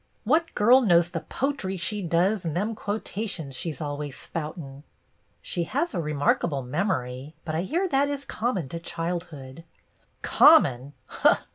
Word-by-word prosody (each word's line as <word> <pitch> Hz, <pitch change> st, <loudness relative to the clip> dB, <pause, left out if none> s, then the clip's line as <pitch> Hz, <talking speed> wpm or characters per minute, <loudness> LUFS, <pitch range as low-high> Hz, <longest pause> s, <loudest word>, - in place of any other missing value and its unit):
What 315 Hz, +9 st, +1 dB
girl 245 Hz, +5 st, +6 dB
knows 175 Hz, -6 st, +4 dB
the 170 Hz, -2 st, -3 dB
potry 250 Hz, -, -3 dB
she 205 Hz, +4 st, -2 dB
does 180 Hz, +4 st, +1 dB
and 165 Hz, -1 st, -2 dB
them 210 Hz, +5 st, -1 dB
quotations 205 Hz, -8 st, -4 dB
she 165 Hz, +5 st, -3 dB
's 145 Hz, -, -11 dB
always 145 Hz, -2 st, -5 dB
spoutin'? 150 Hz, -3 st, -6 dB, 0.3 s
" -, -, -42 dB
"She 170 Hz, -, -2 dB
has 285 Hz, -, -1 dB
a 175 Hz, -, -1 dB
remarkable 145 Hz, -1 st, 0 dB
memory, 130 Hz, -2 st, -2 dB
but 155 Hz, -, -3 dB
I 160 Hz, -, 0 dB
hear 340 Hz, -, 0 dB
that 280 Hz, -3 st, +2 dB
is 280 Hz, -1 st, -4 dB
common 210 Hz, -, -2 dB
to 170 Hz, -, -5 dB
childhood." 165 Hz, -4 st, -5 dB, 0.6 s
"Common! 130 Hz, +2 st, +5 dB
170 Hz, 150 wpm, -26 LUFS, 150-215 Hz, 0.6 s, girl